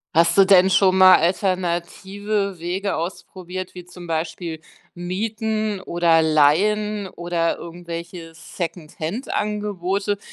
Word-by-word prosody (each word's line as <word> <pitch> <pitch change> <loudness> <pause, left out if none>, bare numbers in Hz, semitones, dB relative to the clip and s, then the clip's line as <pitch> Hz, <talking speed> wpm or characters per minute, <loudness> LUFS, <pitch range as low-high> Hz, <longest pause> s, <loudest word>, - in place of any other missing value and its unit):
Hast 170 +3 +4
du 195 - +7
denn 190 -1 +6
schon 190 -1 +4
mal 185 0 +9
alternative 190 +2 -1
Wege 190 +4 -2
ausprobiert, 185 +1 -6
wie 180 -1 -9
zum 175 0 -12
Beispiel 165 0 -4 0.3
Mieten 215 +3 -3
oder 170 -3 +2
Leihen 200 +7 +2
oder 170 -1 -2
irgendwelche 170 -1 -8
Secondhand 170 - -6
Angebote, 205 -1 -2
180 Hz, 105 wpm, -21 LUFS, 170-200 Hz, 0.3 s, mal